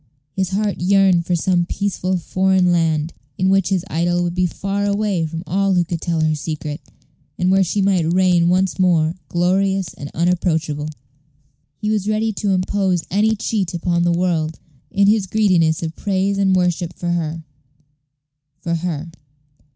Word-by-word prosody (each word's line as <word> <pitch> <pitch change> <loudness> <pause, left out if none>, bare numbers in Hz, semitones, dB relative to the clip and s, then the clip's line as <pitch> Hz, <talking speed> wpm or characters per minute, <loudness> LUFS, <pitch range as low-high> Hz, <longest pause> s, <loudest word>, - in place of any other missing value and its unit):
His 190 -2 0
heart 205 0 -1
yearned 185 -2 +3
for 180 - +1
some 175 +1 +1
peaceful 185 -2 -1
foreign 185 +1 +2
land, 165 -2 +1 0.2
in 185 +1 +1
which 195 -1 +2
his 190 -3 0
idol 175 +2 0
would 175 -1 -2
be 180 0 +1
far 195 +3 -3
away 200 -4 0
from 165 +2 -6
all 195 +2 +1
who 175 - +3
could 165 -1 -4
tell 165 -2 -1
her 155 0 +2
secret, 150 0 -5 0.6
and 180 +1 +1
where 195 0 +4
she 195 +3 0
might 180 -4 +2
reign 180 -2 +3
once 185 +1 +1
more 165 -3 +3 0.2
glorious 190 +1 +1
and 145 - -8
unapproachable. 160 -3 0 0.9
He 210 - -2
was 210 -1 -1
ready 215 +1 0
to 205 0 -2
impose 185 -2 0
any 215 +3 +2
cheat 200 -4 -2
upon 170 0 0
the 175 0 +2
world, 170 -3 0 0.3
in 200 -1 +2
his 205 -1 +3
greediness 180 -7 +2
of 160 0 -4
praise 195 0 -1
and 190 -1 +3
worship 180 -1 0
for 175 -1 -3
her 165 -1 -2 1.2
for 170 0 -3
her. 170 -1 -3
180 Hz, 165 wpm, -19 LUFS, 170-195 Hz, 1.2 s, where